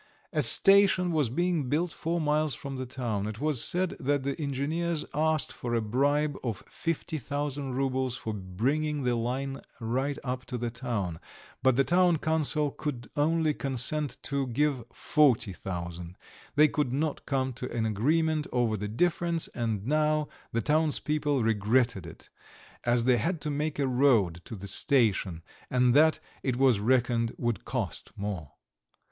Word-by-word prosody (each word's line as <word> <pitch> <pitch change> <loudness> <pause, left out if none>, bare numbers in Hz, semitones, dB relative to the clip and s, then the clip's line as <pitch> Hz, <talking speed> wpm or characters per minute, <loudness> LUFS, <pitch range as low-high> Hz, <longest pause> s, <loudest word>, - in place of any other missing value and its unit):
A - - +2
station 195 -2 +6
was 150 -7 +1
being 165 0 0
built 165 +5 0
four 170 +3 -2
miles 150 -2 +1
from 135 +1 -7
the 130 0 -4
town. 120 -6 -3
It 110 0 -6
was 150 -4 +4
said 185 0 +1
that 145 -2 0
the 140 +1 -1
engineers 150 +4 -2
asked 155 0 +1
for 120 -1 -3
a 115 - +1
bribe 145 +6 +1
of 115 -6 -3
fifty 165 -1 -3
thousand 140 -1 -3
roubles 130 -1 -1
for 110 - -4
bringing 135 +11 -1
the 125 -1 +1
line 130 +4 -2 0.2
right 130 +5 -1
up 125 -1 -3
to 125 - -3
the 120 0 -3
town, 115 -9 -3 0.4
but 130 -2 +4
the 135 - +4
town 175 +1 +3
council 155 -2 +1
would 130 -6 -4
only 155 +1 +2
consent 135 +2 -1
to 140 -2 -1
give 135 +1 0
forty 135 - +2
thousand; 85 -1 -6 0.4
they 150 +1 +7
could 150 -4 -1
not 145 +3 -2
come 130 -2 0
to 125 +1 -6
an 115 -1 -1
agreement 155 +8 +1
over 120 -3 +1
the 105 0 -4
difference, 170 +7 0
and 110 -4 -3
now 150 +1 +1 0.2
the 115 -1 -1
townspeople 150 -2 +1
regretted 110 -2 +1
it, 85 - -12 0.6
as 120 -1 +2
they 125 0 +4
had 165 - -1
to 150 - -2
make 150 +1 -2
a 140 - +1
road 120 -10 +2
to 115 - -7
the 100 0 -8
station 100 - +2 0.3
and 125 -1 +3
that, 155 +3 +5 0.2
it 130 -2 -1
was 130 -4 +3
reckoned, 120 0 +1
would 120 -4 -2
cost - - -4
more. 100 -8 -5
135 Hz, 160 wpm, -28 LUFS, 115-150 Hz, 0.6 s, they